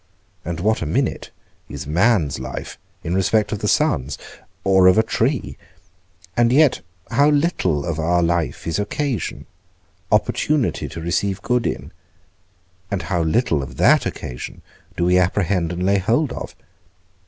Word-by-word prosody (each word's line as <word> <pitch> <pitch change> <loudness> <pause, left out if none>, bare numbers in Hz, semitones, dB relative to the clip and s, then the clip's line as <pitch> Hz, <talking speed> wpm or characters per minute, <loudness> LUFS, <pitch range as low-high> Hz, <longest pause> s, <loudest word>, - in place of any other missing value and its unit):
and 85 -1 -4
what 110 +3 +1
a - - -1
minute 75 - -1 0.4
is - - -6
man's 85 - +2
life 65 +1 -7 0.2
in 85 - -2
respect 100 +3 +2
of 105 - -2
the 105 - -2
sun's, 100 - +1 0.5
or 95 -1 +5
of 95 - +6
a 110 - +5
tree? 120 +4 -1 0.8
and 120 0 +3
yet 145 +1 +4 0.3
how 140 +5 +4
little 145 - +1
of 80 -2 -3
our 85 +2 +2
life 85 -4 -1
is 80 +2 -1
occasion, 125 - -3 0.7
opportunity 150 -5 +1
to - - -7
receive 95 +4 -1
good 125 -1 +1
in; - - -4 1.0
and 100 -3 -2
how 85 - +2
little 80 - +1
of 65 - -8
that - - +4
occasion 60 -1 -7 0.3
do 85 - +1
we 90 +1 +4
apprehend 90 -2 +1
and 90 +1 -3
lay 100 +1 +3
hold 120 - +1
of? - - -7
95 Hz, 150 wpm, -21 LUFS, 85-115 Hz, 1.0 s, of